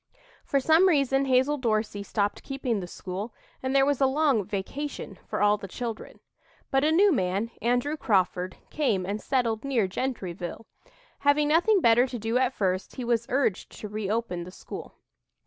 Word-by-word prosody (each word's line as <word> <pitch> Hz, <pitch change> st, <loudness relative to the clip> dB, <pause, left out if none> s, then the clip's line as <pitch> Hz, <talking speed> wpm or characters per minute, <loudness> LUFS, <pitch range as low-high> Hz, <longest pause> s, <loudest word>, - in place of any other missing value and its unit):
For 275 Hz, -, +1 dB
some 320 Hz, +7 st, +5 dB
reason 275 Hz, -5 st, +3 dB
Hazel 265 Hz, +3 st, +2 dB
Dorsey 215 Hz, -4 st, 0 dB
stopped 205 Hz, 0 st, -1 dB
"keeping" 270 Hz, -5 st, -2 dB
the 180 Hz, -, -6 dB
school, 195 Hz, +5 st, -6 dB, 0.3 s
and 260 Hz, +1 st, -2 dB
there 270 Hz, 0 st, +5 dB
was 285 Hz, -1 st, 0 dB
a 270 Hz, -, +6 dB
long 275 Hz, -5 st, +2 dB
"vacation" 205 Hz, +2 st, -5 dB
for -, -, -1 dB
all 205 Hz, 0 st, +4 dB
the 200 Hz, -, -8 dB
children. 230 Hz, +3 st, -6 dB, 0.5 s
But 270 Hz, 0 st, +3 dB
a 305 Hz, -, +3 dB
new 390 Hz, +5 st, +5 dB
man, 200 Hz, -, 0 dB
Andrew 245 Hz, +5 st, +1 dB
Crawford, 185 Hz, -7 st, 0 dB
came 215 Hz, -12 st, 0 dB
and 205 Hz, +3 st, -3 dB
settled 235 Hz, -5 st, 0 dB
near 255 Hz, -8 st, +1 dB
Gentryville. 185 Hz, -4 st, -4 dB, 0.5 s
Having 290 Hz, +1 st, +3 dB
nothing 365 Hz, +6 st, +4 dB
better 235 Hz, 0 st, +5 dB
to 250 Hz, -, -5 dB
do 225 Hz, +3 st, 0 dB
at 260 Hz, 0 st, +1 dB
first, 185 Hz, -1 st, -1 dB
he 255 Hz, -, -4 dB
was 235 Hz, -1 st, 0 dB
urged 250 Hz, -7 st, 0 dB
to 210 Hz, -, -5 dB
reopen 210 Hz, -3 st, -2 dB
the 175 Hz, -, -9 dB
school. 185 Hz, -, -9 dB
235 Hz, 170 wpm, -27 LUFS, 205-275 Hz, 0.5 s, a